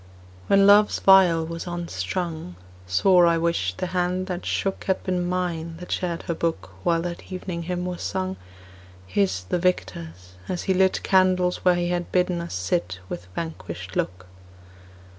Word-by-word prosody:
When 195 0 +5
Love's 205 +1 +6
viol 180 -4 +6
was 165 +2 -6
unstrung, 165 - -4 0.3
Sore 175 - +5
I 170 0 +3
wished 165 - 0
the - - -2
hand 180 +1 0
that 180 -1 -5
shook 195 -1 -1
Had 190 - 0
been 180 -1 -1
mine 170 -3 -2
that 180 +1 -9
shared 175 -3 -2
her 170 - -2
book 165 0 -2
While 165 -1 +1
that 175 +2 -6
evening 180 -2 -4
hymn 180 +1 -3
was 180 -1 -4
sung, 190 0 -2 0.7
His 95 0 0
the 135 - -1
victor's, 90 - -3
as 180 -2 -2
he 190 - +1
lit 190 0 +2
Candles 185 -1 +3
where 180 -1 +3
he 175 0 -1
had 175 0 -2
bidden 180 -1 +1
us 170 - -6
sit 90 -1 -1
With 90 0 -6
vanquished 95 - -6
look. 90 0 -2
175 Hz, 160 wpm, -24 LUFS, 160-185 Hz, 0.7 s, Love's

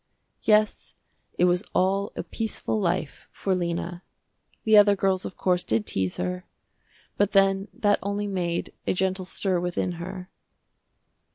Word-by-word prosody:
Yes 215 -1 +2 0.4
it 180 - +4
was 180 +2 +2
all 195 +2 +2
a - - -3
peaceful 220 -1 -2
life 175 -6 -2
for 195 - -1
Lena. 175 0 -2 0.6
The 220 -1 +4
other 205 -1 +7
girls, 190 -1 +1
of - - -7
course, 180 -1 +1
did 110 -1 0
tease 95 -1 -1
her, 90 0 -3 0.7
but 205 0 +2
then 195 0 +3
that 205 -1 +1
only 200 +1 -2
made 180 -4 -2
a - - +3
gentle 190 0 -1
stir 185 0 0
within 180 +1 -1
her. 185 +1 -7
190 Hz, 145 wpm, -26 LUFS, 175-200 Hz, 0.7 s, other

